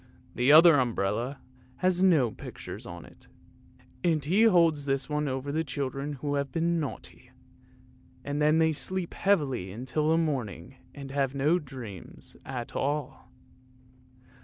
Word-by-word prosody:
The 125 +4 +3
other 160 -1 +8
umbrella 120 +2 -1 0.4
has 185 +2 +2
no 155 -11 +4
pictures - - -9
on 85 0 -9
it, - - -18 0.8
and 155 -4 +1
he 195 +9 +4
holds 165 -8 +4
this 135 -2 0
one 150 0 -1
over 135 +1 -3
the 160 +2 0
children 140 0 -4
who 145 +1 -3
have 140 -1 -1
been 170 +3 0
naughty, 130 -3 -6 1.0
and 145 +1 -2
then 150 +1 +4
they 160 -1 +3
sleep 185 +3 -3
heavily 135 - 0
till 150 +4 0
the 160 - +4
morning 130 - -3 0.2
and 140 -2 -8
have 135 -1 -1
no 150 +6 +2
dreams 125 - -9
at 125 -3 -6
all. 135 -2 -3
145 Hz, 140 wpm, -28 LUFS, 130-160 Hz, 1.0 s, other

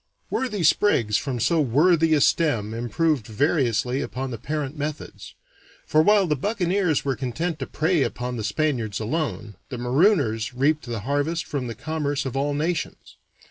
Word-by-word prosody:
Worthy 210 -8 -1
sprigs 125 - +3
from 130 -1 -3
so 165 +8 +2
worthy 160 +5 +3
a 145 - +2
stem 120 -12 +2
improved 125 +2 0
variously 125 0 +1
upon 130 -1 -4
the 115 - -6
parent 150 +1 -3
methods; 150 0 -6 0.5
for 155 - +3
while 205 +3 +4
the 155 -3 +1
buccaneers 180 - 0
were 135 -1 0
content 155 +6 -3
to - - -4
prey 160 0 +1
upon 125 -1 -2
the 110 - -4
Spaniards 115 -2 -1
alone, 115 -3 -3
the 125 - -5
marooners 125 - +2
reaped 145 +2 +1
the 115 -3 -4
harvest 145 +7 -1
from 135 -4 -3
the 115 - -5
commerce 145 +1 -2
of 130 - -4
all 140 +1 0
nations. 160 +3 -3
145 Hz, 160 wpm, -24 LUFS, 120-160 Hz, 0.5 s, while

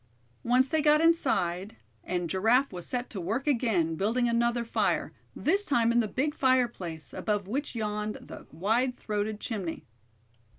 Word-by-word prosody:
Once 250 +2 +3
they 315 +2 +1
got 300 0 +5
inside, 225 - +1 0.3
and 180 -1 -2
Giraffe 225 - +2
was 175 -1 -5
set 250 0 -2
to 195 - -5
work 220 +10 -2
again, 225 - +1
building 225 +8 +1
another 235 0 +1
fire, 230 - 0 0.2
this 390 +6 +2
time 235 - +2
in 240 - +3
the 225 - +1
big 285 +7 -1
fireplace, 240 - 0
above 205 -3 -2
which 270 +5 -3
yawned 210 -1 -2
the - - -11
wide 225 - 0
throated 210 -1 -3
chimney. 195 -9 -4
230 Hz, 155 wpm, -28 LUFS, 200-255 Hz, 0.3 s, got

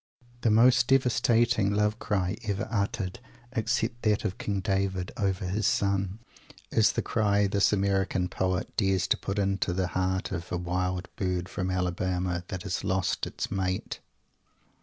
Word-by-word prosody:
The 115 - +3
most 120 +2 +5
devastating 120 -5 +3
love 105 +2 +1
cry 95 -2 0
ever 100 +1 -2
uttered, 100 -3 -1 0.3
except 115 0 -1
that 105 0 +1
of 95 -3 -3
King 100 -2 -1
David 95 -1 -1
over 100 -1 -1
his 100 +4 +1
friend, 100 -1 0 0.5
is 110 - +4
the - - -1
cry 105 -2 +2
this 100 0 +3
American 95 -2 +1
poet 90 0 -2
dares 95 -3 +2
to - - +4
put 100 +1 -4
into 100 -2 0
the 90 0 -1
heart 95 +1 -1
of 85 0 -5
"a 90 - 0
wild 90 +1 -2
bird 90 -2 -1
from 90 0 -3
Alabama" 90 -1 -1
that 95 0 -5
has 100 -2 -3
lost 95 0 0
its - - -5
mate. 95 -1 -2
95 Hz, 155 wpm, -28 LUFS, 90-105 Hz, 0.5 s, most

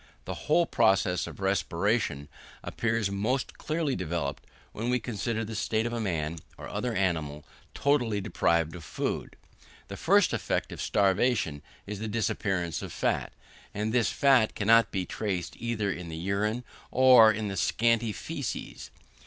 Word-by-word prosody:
The - - -4 0.2
whole 170 +3 +5
process 95 - +2
of - - -10
respiration 95 - 0 0.4
appears 115 -3 -1
most 110 +7 -2
clearly 155 -3 -1
developed, 85 -5 -3 0.2
when 115 +3 -3
we 125 0 +2
consider 115 0 -3
the 110 - -6
state 110 +1 0
of 120 - -2
a 120 - -2
man, 85 -5 -2 0.2
or - - -8
other 125 -2 -3
animal, 80 -6 -1 0.3
totally 125 -7 +1
deprived 85 -4 +1
of 85 - -9
food. - - -3 0.5
The - - -6
first - - +3
effect - - -1
of - - -6
starvation 100 - +1 0.2
is 105 0 -6
the 110 - -3
disappearance 95 -6 -1
of - - -6
fat, - - -1 0.4
and 105 +2 -1
this 120 -4 +3
fat 130 -6 +3
cannot 115 +2 +4
be 95 -2 -2
traced 95 -5 -3
either 115 -4 -1
in 90 -2 -6
the 80 - -6
urine 100 +7 -1 0.3
or 125 -4 +7
in 110 0 -3
the 100 - -4
scanty 115 +4 +2
faeces. 140 +2 -5
105 Hz, 155 wpm, -28 LUFS, 90-115 Hz, 0.5 s, or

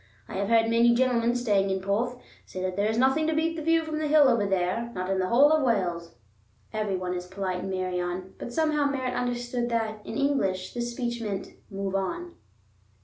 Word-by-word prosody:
I - - -9
have 200 0 -1
heard 225 -1 +4
many 235 +1 +4
gentlemen 240 -1 +2
staying 205 -5 +1
in 190 0 0
Porth 220 +6 -1 0.3
say 185 - -7
that 185 -1 -2
there 205 +2 +1
is 220 - -1
nothing 265 +5 +3
to 320 - +1
beat 325 +1 0
the 325 - -4
view 330 +1 +2
from 310 -1 -3
the 310 - -1
hill 295 -1 +6
over 235 -5 +2
there, 195 +5 0
not 185 +1 -2
in 190 - +1
the 185 - 0
whole 275 +8 +5
of 315 0 +4
Wales." 175 - -1 0.6
Every 210 -3 -1
one 180 -1 -3
is 180 0 -5
polite 185 -1 -3
in 195 - -5
Meirion, 185 0 -3
but 240 - -6
somehow 305 0 +1
Merritt 260 -3 -1
understood 245 0 -2
that, 220 -2 -1
in - - -6
English, 195 -10 0
this 240 0 -2
speech 240 -1 -3
meant 205 -3 -4 0.2
"move 195 -1 -4
on." 340 - -3
230 Hz, 210 wpm, -27 LUFS, 190-255 Hz, 0.6 s, hill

